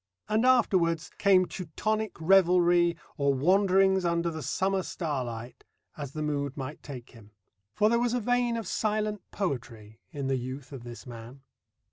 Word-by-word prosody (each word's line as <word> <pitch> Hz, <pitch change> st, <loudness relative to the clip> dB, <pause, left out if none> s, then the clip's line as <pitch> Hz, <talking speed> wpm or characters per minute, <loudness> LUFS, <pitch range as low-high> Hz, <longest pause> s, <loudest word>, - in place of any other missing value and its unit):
And 220 Hz, +4 st, +2 dB
afterwards 180 Hz, -10 st, +2 dB
came 190 Hz, -2 st, +5 dB
Teutonic 215 Hz, +5 st, -3 dB
revelry 175 Hz, -1 st, +4 dB, 0.2 s
or 140 Hz, -2 st, +2 dB
wanderings 190 Hz, +4 st, +3 dB
under 170 Hz, 0 st, 0 dB
the 160 Hz, -1 st, -6 dB
summer 190 Hz, +8 st, 0 dB
starlight, 130 Hz, -10 st, -5 dB, 0.3 s
as 140 Hz, -3 st, -7 dB
the 155 Hz, -, -3 dB
mood 145 Hz, -2 st, -2 dB
might 140 Hz, +2 st, -6 dB
take 130 Hz, -4 st, -9 dB
him. 110 Hz, -3 st, -17 dB, 0.4 s
For 210 Hz, -, +3 dB
there 235 Hz, +1 st, +3 dB
was 245 Hz, 0 st, +1 dB
a -, -, +1 dB
vein 245 Hz, 0 st, +1 dB
of 225 Hz, -, -4 dB
silent 215 Hz, +1 st, -1 dB
poetry 115 Hz, -, -5 dB
in 145 Hz, -4 st, -5 dB
the 135 Hz, 0 st, +1 dB
youth 130 Hz, +2 st, -7 dB
of 135 Hz, -4 st, -8 dB
this 120 Hz, -1 st, -9 dB
man. 120 Hz, +2 st, -10 dB
170 Hz, 155 wpm, -28 LUFS, 135-195 Hz, 0.4 s, came